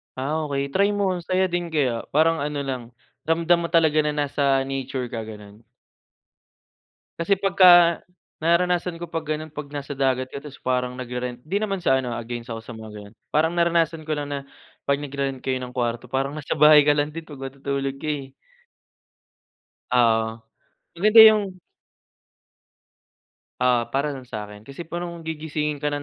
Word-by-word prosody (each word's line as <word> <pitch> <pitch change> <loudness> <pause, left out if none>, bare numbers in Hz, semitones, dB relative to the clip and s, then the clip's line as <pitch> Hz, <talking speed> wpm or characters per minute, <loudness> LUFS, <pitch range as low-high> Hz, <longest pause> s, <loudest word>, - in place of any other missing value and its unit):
Ah, 150 +4 -2
okey 140 -1 -2
try 200 +6 +3
mo 200 -2 +1
ang - - -7
saya 185 +2 +2
din 175 0 -1
kaya, 135 -8 -1
parang 160 +2 +3
ano, 145 0 -2
lang 130 -3 -4 0.4
ramdam 170 +1 +3
mo 170 - -2
talaga 160 -2 +3
na 150 -1 0
nasa 140 -2 +1
nature 135 -2 -4
ka 115 - -3
ganon. 105 -1 -11 1.6
Kasi, 170 +4 +2
pagka, 180 -3 +6 0.4
nararanasan 170 +1 +1
ko 175 - -6
pag 165 -1 -4
ganun, 155 +1 -3
'pag 150 -1 -7
nasa 145 -1 -5
dagat 130 -1 0
ka, - - -7
tapos, 140 0 -11
parang 125 -1 -1
nagre-rent, 125 -1 -5
'di 175 +9 -2
naman 200 -3 -2
sa 135 -5 +3
ano, 125 -2 -3
ah, 120 - -4
against 120 0 -6
ako 115 - -6
sa 115 0 -10
mga 110 0 -9
ganon, 105 +1 -11 0.2
parang 160 +3 +2
naranasan 165 -2 +1
ko 155 - -1
lang 145 -1 -4
na 140 -1 -3 0.5
pag 140 0 +1
nagre-rent 135 -2 -3
kayo 130 -1 -1
ng 125 -1 -7
kwarto 120 -1 -2
parang 135 +4 -2
nasa 145 - -3
bahay 150 0 +7
ka 145 - +5
lang 145 0 0
din 165 +1 -8
pag 145 -4 -11
matutulog 135 0 -3
ka, 145 - -9
eh. 145 -3 -3 1.6
Oo 115 -2 +2 0.5
maganda 215 +5 +8
yung. 200 -4 -1 2.0
Oo, 125 -2 +2
para 140 +2 -1
lang 135 - -8
sakin, 105 -1 -7
kasi, 140 +9 -9
parang 170 0 -6
gigisingin 150 -2 -3
ka 150 - 0
145 Hz, 170 wpm, -23 LUFS, 130-165 Hz, 2.0 s, maganda